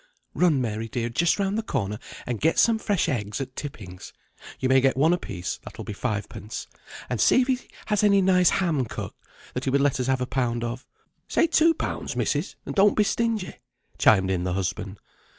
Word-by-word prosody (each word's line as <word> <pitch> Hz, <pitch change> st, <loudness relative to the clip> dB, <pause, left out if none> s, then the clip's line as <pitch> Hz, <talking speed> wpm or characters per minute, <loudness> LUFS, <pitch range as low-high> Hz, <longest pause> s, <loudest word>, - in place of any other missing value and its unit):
"Run, 170 Hz, -6 st, +3 dB
Mary 115 Hz, -2 st, -2 dB
dear, 120 Hz, +1 st, -2 dB
just 165 Hz, +8 st, +2 dB
round 200 Hz, +1 st, 0 dB
the -, -, 0 dB
corner, 105 Hz, -, -3 dB, 0.3 s
and 120 Hz, -3 st, -3 dB
get 160 Hz, +2 st, +2 dB
some 230 Hz, -1 st, +4 dB
fresh 205 Hz, -6 st, 0 dB
eggs 105 Hz, -7 st, -2 dB
at 130 Hz, -1 st, -6 dB
Tipping's 105 Hz, -11 st, -8 dB, 0.5 s
(you 130 Hz, -, 0 dB
may 130 Hz, 0 st, +5 dB
get 130 Hz, 0 st, +2 dB
one 160 Hz, +5 st, +4 dB
a -, -, +2 dB
piece, 90 Hz, -, -5 dB
that -, -, -11 dB
will -, -, -7 dB
be -, -, -5 dB
five 105 Hz, -1 st, -2 dB
pence), 105 Hz, 0 st, -7 dB, 0.4 s
and 125 Hz, -, -2 dB
see 255 Hz, -, +5 dB
if -, -, -6 dB
he 260 Hz, -2 st, +1 dB, 0.3 s
has 210 Hz, -1 st, +1 dB
any 200 Hz, -1 st, +5 dB
nice 185 Hz, -1 st, +4 dB
ham 165 Hz, -9 st, +1 dB
cut, -, -, -6 dB, 0.4 s
that 125 Hz, -, -3 dB
he -, -, +1 dB
would 140 Hz, +2 st, +2 dB
let 140 Hz, -2 st, +2 dB
us 125 Hz, -, -1 dB
have 130 Hz, -1 st, +1 dB
a 125 Hz, -, -1 dB
pound 120 Hz, -2 st, -1 dB
of." 120 Hz, +2 st, -5 dB, 0.4 s
"Say -, -, +3 dB
two 330 Hz, 0 st, +4 dB
pounds, -, -, -4 dB
missis, -, -, -1 dB
and -, -, -4 dB
don't 205 Hz, 0 st, +4 dB
be 210 Hz, -, +5 dB
stingy," 220 Hz, -2 st, -1 dB, 0.4 s
chimed 95 Hz, -3 st, +4 dB
in 90 Hz, -2 st, 0 dB
the 90 Hz, -1 st, -1 dB
husband. 95 Hz, +2 st, -3 dB
130 Hz, 215 wpm, -25 LUFS, -, 0.5 s, may